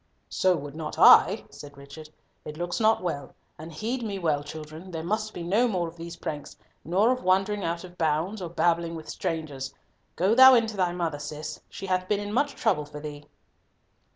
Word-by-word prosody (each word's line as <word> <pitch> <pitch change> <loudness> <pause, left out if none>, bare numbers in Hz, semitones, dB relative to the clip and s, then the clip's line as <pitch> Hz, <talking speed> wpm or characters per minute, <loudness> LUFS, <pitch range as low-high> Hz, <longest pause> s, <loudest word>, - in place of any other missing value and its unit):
"So 185 -1 +2
would 145 -3 -7
not 155 -1 -6
I," - - +7
said 145 -1 -12
Richard. 140 +3 -11 0.3
"It 150 0 -8
looks 175 +4 -3
not 220 -3 +3
well, 145 -6 -4 0.2
and 160 +2 -8
heed 230 +10 -3
me 210 -4 -3
well, 155 -5 0
children, 155 +4 -9
there 165 -3 -5
must 215 +4 -2
be 175 - -7
no 210 +8 +2
more 180 -6 -1
of 165 - -10
these 170 0 -8
pranks, 150 -4 -6 0.3
nor 195 +9 +3
of 255 0 -1
wandering 195 +2 +1
out 170 +1 -2
of 180 -1 -13
bounds, 165 +6 0
or 175 - -4
babbling 170 0 +1
with 160 -1 -9
strangers. 155 -7 -4 0.4
Go 190 +5 +2
thou 260 +2 +9
in 230 -1 +4
to 220 -1 -6
thy 180 -3 +1
mother, 170 -4 -3
Cis, 150 +1 -6
she - - -8
hath 185 -1 -1
been 205 0 +1
in 205 0 -5
much 285 +4 +1
trouble 185 -10 +1
for 150 0 -9
thee." 150 -1 -8
170 Hz, 205 wpm, -26 LUFS, 155-200 Hz, 0.4 s, thou